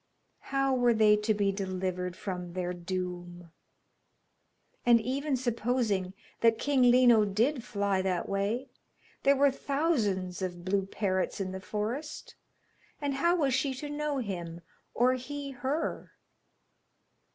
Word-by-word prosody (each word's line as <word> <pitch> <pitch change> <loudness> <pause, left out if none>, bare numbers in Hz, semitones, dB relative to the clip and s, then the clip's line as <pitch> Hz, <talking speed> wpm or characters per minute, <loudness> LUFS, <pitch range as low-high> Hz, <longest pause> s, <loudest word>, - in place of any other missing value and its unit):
How 275 -1 +1
were 245 -2 +3
they 215 -1 +6
to 210 +1 +1
be 200 -1 +2
delivered 185 -2 -3
from 180 -4 -5
their 180 -1 -2
doom? 175 -1 -5 1.3
And 240 -1 +6
even 270 +4 -1
supposing 235 -6 -1 0.2
that 230 -1 +4
King 280 +1 +1
Lino 240 -3 +6
did 230 +7 +1
fly 200 -4 0
that 185 -2 -1
way, 205 +7 -1 0.5
there 280 +1 +4
were 280 0 +4
thousands 225 - -1
of 175 -2 -4
blue 195 0 0
parrots 190 -2 -1
in 190 -1 -2
the 190 0 -6
forest, 225 +10 -4 0.7
and 285 -1 -1
how 340 +6 +2
was 280 -7 +1
she 265 +1 0
to 290 +3 -6
know 295 -1 -2
him, 175 -8 -5 0.3
or 250 +2 +4
he 280 +2 -5
her? 270 +5 -3
220 Hz, 130 wpm, -30 LUFS, 185-265 Hz, 1.3 s, they